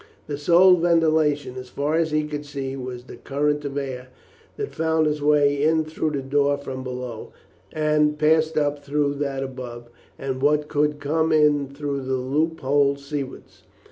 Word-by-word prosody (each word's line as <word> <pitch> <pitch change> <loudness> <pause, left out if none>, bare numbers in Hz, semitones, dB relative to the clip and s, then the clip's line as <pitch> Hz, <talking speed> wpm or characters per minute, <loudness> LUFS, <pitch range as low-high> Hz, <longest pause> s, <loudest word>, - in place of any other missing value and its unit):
The 145 -1 -5
sole 180 +4 +6
ventilation, 155 -5 +2
as 125 0 -8
far 145 +4 -2
as 165 0 +2
he 155 0 +1
could 150 -1 -5
see, 135 -2 -5
was 125 -2 -6
the - - -11
current 150 +1 -1
of 140 0 -4
air 130 -2 -4 0.5
that 425 -1 -4
found 160 -1 +1
its 150 -1 -1
way 145 -1 +3
in 160 +1 +2
through 155 0 -2
the 140 -3 -3
door 140 +1 +1
from 135 -2 -6
below, 125 -3 -6 0.4
and 150 -1 +1
passed 155 +1 +2
up 145 -1 0
through 145 0 0
that 135 -2 -2
above, 120 -3 -8 0.3
and 130 -1 -4
what 150 +1 +2
could 150 0 0
come 160 +3 0
in 150 -2 +3
through 140 0 -4
the 130 0 -2
loop 150 +6 -1
hole 140 +1 +2
seawards. 140 -1 -7
145 Hz, 170 wpm, -23 LUFS, 135-155 Hz, 0.5 s, sole